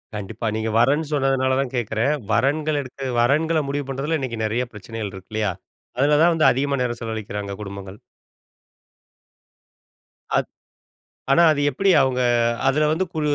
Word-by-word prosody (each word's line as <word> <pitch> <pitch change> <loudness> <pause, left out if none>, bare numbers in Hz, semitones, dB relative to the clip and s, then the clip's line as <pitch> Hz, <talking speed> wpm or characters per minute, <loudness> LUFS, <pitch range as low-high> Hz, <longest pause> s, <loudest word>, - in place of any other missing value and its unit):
கண்டிப்பா, 105 +3 -6
நீங்க 110 0 -2
வரேன்னு 145 +5 +2
சொன்னதுனால 135 -2 +1
தான் 135 -2 -1
கேட்கிறேன். 120 +3 0 0.2
வரன்கள் 145 +6 +1
எடுத்து 135 +1 -8
வரன்கள 155 +6 +2
முடிவு 145 0 -2
பண்றதுல 145 +4 -1
இன்னைக்கு 120 -4 -4
நெறைய 115 +4 0
பிரச்சனைகள் 105 0 -6
இருக்கு 95 +2 -12
இல்லையா? 105 -3 0 0.5
அதில 145 +3 +3
தான் 175 - +5
வந்து 160 -1 +4
அதிகமா 140 +2 0
நேரம் 120 -1 -3
செலவழிக்கிறாங்க 105 -3 -5
குடும்பங்கள். 100 0 -8 2.4
அத் - - 0 0.9
ஆனா, 170 - +5
அது 145 - -2
எப்டி 195 +9 +1
அவங்க 130 -1 0 0.5
அதில 150 +2 +2
வந்து 185 +4 0
கு 155 - -2
130 Hz, 140 wpm, -22 LUFS, 110-145 Hz, 2.4 s, தான்